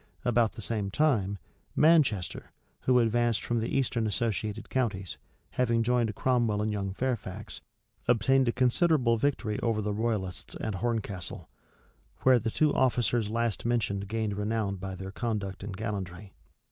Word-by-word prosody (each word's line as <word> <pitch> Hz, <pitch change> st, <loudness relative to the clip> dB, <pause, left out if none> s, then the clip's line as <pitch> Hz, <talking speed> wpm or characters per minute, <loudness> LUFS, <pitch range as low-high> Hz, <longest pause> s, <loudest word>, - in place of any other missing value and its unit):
About 120 Hz, -2 st, +3 dB
the 110 Hz, -, -7 dB
same 105 Hz, -2 st, -2 dB
time, 105 Hz, -6 st, +1 dB, 0.4 s
Manchester, 145 Hz, -, +3 dB, 0.4 s
who 130 Hz, -1 st, +5 dB
advanced 120 Hz, -1 st, +2 dB
from 120 Hz, -1 st, 0 dB
the 115 Hz, -, -2 dB
eastern 120 Hz, -4 st, 0 dB
associated 110 Hz, -1 st, -2 dB
counties, 105 Hz, -8 st, -2 dB, 0.3 s
having 115 Hz, -2 st, +1 dB
joined 120 Hz, -3 st, +1 dB
Cromwell 120 Hz, -4 st, +1 dB
and 105 Hz, +1 st, 0 dB
young 100 Hz, -2 st, -2 dB
Fairfax, 115 Hz, -3 st, -4 dB, 0.5 s
obtained 130 Hz, +3 st, +3 dB
a -, -, +4 dB
considerable 125 Hz, -1 st, +3 dB
victory 120 Hz, -5 st, 0 dB
over 115 Hz, -2 st, 0 dB
the 105 Hz, 0 st, -1 dB
royalists 105 Hz, -5 st, -2 dB
at 110 Hz, -, -2 dB
Horncastle; 100 Hz, -3 st, -3 dB, 0.7 s
where 130 Hz, -2 st, +6 dB
the 115 Hz, +1 st, -2 dB
two 150 Hz, +5 st, +2 dB
officers 120 Hz, -3 st, +2 dB
last 115 Hz, -1 st, -1 dB
mentioned 100 Hz, -4 st, 0 dB
gained 110 Hz, -1 st, -1 dB
renown 105 Hz, -1 st, -1 dB
by 95 Hz, 0 st, -5 dB
their 95 Hz, +1 st, -7 dB
conduct 100 Hz, -4 st, -3 dB
and 100 Hz, -2 st, -6 dB
gallantry. 100 Hz, -3 st, -5 dB
110 Hz, 145 wpm, -29 LUFS, 100-120 Hz, 0.7 s, where